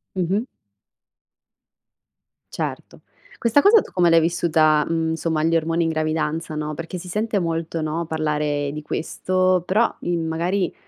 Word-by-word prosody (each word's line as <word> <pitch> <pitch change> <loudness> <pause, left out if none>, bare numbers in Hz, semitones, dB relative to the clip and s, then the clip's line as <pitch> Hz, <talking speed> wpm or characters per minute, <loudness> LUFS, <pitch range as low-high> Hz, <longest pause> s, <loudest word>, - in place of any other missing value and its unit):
Mh-mh. 190 +6 0 2.1
Certo, - - -5 0.4
questa 235 +5 +3
cosa 420 +4 +6
tu - - -12
come 175 -2 +3
l'hai 165 0 +5
vissuta, 155 -2 +2
mhmm, 160 -1 0
somma 160 -1 -1
gli 165 +1 +2
ormoni 165 +1 +1
in 165 - 0
gravidanza, 155 0 -2
no, 150 0 -3
perché 165 +4 -6
si 180 +1 -9
sente 210 +2 -1
molto, 165 -1 -2
no, 160 +2 -2
parlare 150 -2 -1
di 150 +1 -6
questo, 185 +4 0
però, 215 +6 +2
uhm, 170 -2 -2
magari 175 +3 -1
165 Hz, 145 wpm, -22 LUFS, 155-180 Hz, 2.1 s, cosa